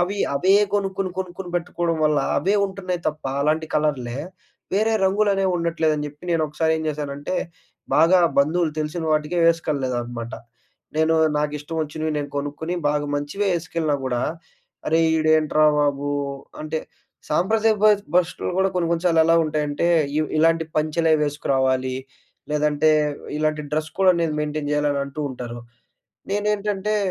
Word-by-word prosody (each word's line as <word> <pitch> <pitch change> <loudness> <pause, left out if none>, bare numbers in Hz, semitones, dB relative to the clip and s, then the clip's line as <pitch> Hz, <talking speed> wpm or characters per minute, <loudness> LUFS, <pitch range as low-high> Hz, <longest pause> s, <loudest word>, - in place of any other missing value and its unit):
అవి 190 +3 -1 0.2
అవే 185 +7 +3 0.2
గొనుక్కొని 195 -2 -1
కొనుక్కొని 185 -1 -5
పెట్టుకోవడం 170 -1 -2
వల్ల 150 -1 +3 0.2
అవే 195 +2 +1
ఉంటున్నాయి 185 -2 -4
తప్ప 155 0 -7 0.2
అలాంటి 155 +2 +1
కలర్లే 135 -5 0 0.5
వేరే 215 +3 +2
రంగులనేవి 195 -1 +2
ఉండట్లేదని 165 -3 0
జెప్పి 150 +3 -12
నేనొకసారి 160 -1 +1
ఏం 160 - -4
జేశానంటే 145 +1 -3 0.6
బాగా 165 +4 +5 0.2
బంధువులు 155 +3 +2
తెలిసిన 155 +2 -3
వాటికే 155 +3 0
వేసుకెల్ల‌‌‌‌లేదనమాట. 125 -7 -1 0.6
నేను 160 +1 +3 0.2
నాకిష్టం 150 +1 -3
వచ్చినవి 155 +1 -3
నేను 145 -1 -4
కొనుక్కొని, 145 +4 -3
బాగా 145 0 0
మంచివే 145 +8 -2
వేసుకెళ్ళినా 160 -2 -1
గూడా, 125 -2 -1 0.7
అరే! 160 +1 +3 0.2
ఈడేంట్రా 155 -1 +3
బాబు! 145 -1 0 0.5
అంటే 155 +1 -2 0.5
సాంప్రదాయ 220 +8 +2
బస్ 210 -1 +5
బష్టులు 180 -1 0
కూడా 190 0 +3
కొన్ని 175 -2 0
కొన్ని 170 +1 -1
సార్లు 165 -2 +4
ఎలా 165 +1 +4
ఉంటాయంటే, 150 0 -1 0.3
ఇవ్ 155 - 0
ఇలాంటి 165 +1 +3
పంచలే 155 +1 +2
వేసుకురావాలి. 130 -3 0 0.6
లేదంటే 150 +1 +2 0.5
ఇలాంటి 155 0 0
డ్రస్ 155 +1 -2
కోడ్ 190 0 +5
అనేది 165 -3 0
మెయింటెయిన్ 150 -1 -3
జేయాలి 150 0 +1
అని 140 - -1
అంటూ 140 +2 -7
ఉంటారు. 120 -2 -7 0.7
నేనేంటంటే, 210 0 0
155 Hz, 135 wpm, -22 LUFS, 150-175 Hz, 0.7 s, బాగా